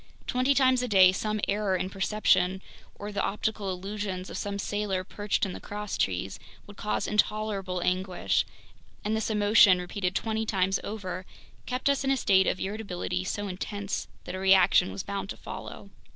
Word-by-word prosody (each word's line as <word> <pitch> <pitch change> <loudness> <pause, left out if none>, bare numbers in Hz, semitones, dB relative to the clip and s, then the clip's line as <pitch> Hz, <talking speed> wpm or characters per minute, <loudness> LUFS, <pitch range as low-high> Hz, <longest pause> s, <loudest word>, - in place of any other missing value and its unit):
Twenty 255 +3 +2
times 260 -2 +4
a 250 - -1
day 190 -4 +7
some 215 +3 -2
error 200 -1 +1
in 185 - -1
perception, 195 -2 +2 0.3
or 205 +1 -6
the 205 - -1
optical 210 -1 -2
illusions 190 0 -4
of - - -5
some 200 0 -3
sailor 200 -2 -1
perched 205 +4 -1
in 190 - -4
the - - -7
crosstrees, 145 - -3 0.3
would 205 - -12
cause 210 - -2
intolerable 205 -4 0
anguish, 185 0 +1 0.6
and 215 +1 +1
this 220 0 -1
emotion, 205 -2 +6
repeated 180 +1 -3
twenty 220 +1 -1
times 195 -3 +1
over, 185 -3 -5 0.4
kept 250 +2 -2
us 280 -1 +2
in 270 - 0
a 270 - +3
state 190 -5 +4
of - - 0
irritability 190 -3 -3
so 205 +2 -3
intense 200 +1 -4 0.2
that 180 - -7
a 185 - -4
reaction 190 -1 +5
was 190 - -5
bound 195 -1 -4
to - - -5
follow. - - -8
200 Hz, 170 wpm, -28 LUFS, 185-215 Hz, 0.6 s, day